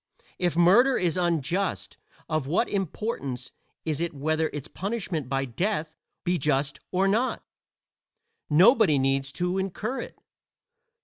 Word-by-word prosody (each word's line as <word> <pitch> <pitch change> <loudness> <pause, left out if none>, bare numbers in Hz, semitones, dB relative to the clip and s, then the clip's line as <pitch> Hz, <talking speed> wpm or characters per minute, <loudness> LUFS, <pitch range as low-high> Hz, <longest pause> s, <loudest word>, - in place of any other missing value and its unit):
If 175 -2 0
murder 220 +10 +5
is 175 -2 +1
unjust 175 +1 -1 0.3
of 155 -4 -1
what 175 - +2
importance 165 - -3 0.3
is 155 -1 -1
it 170 -2 -2
whether 155 +3 0
its 145 0 -6
punishment 185 - -4
by 135 +1 0
death 160 - -2 0.3
be 180 -1 0
just 140 -1 0
or 190 +1 +2
not? 230 +6 +1 1.1
nobody 185 - +6
needs 135 0 +1
to 180 +5 -1
incur 205 +7 -3
it. - - -9
170 Hz, 125 wpm, -26 LUFS, 145-195 Hz, 1.1 s, nobody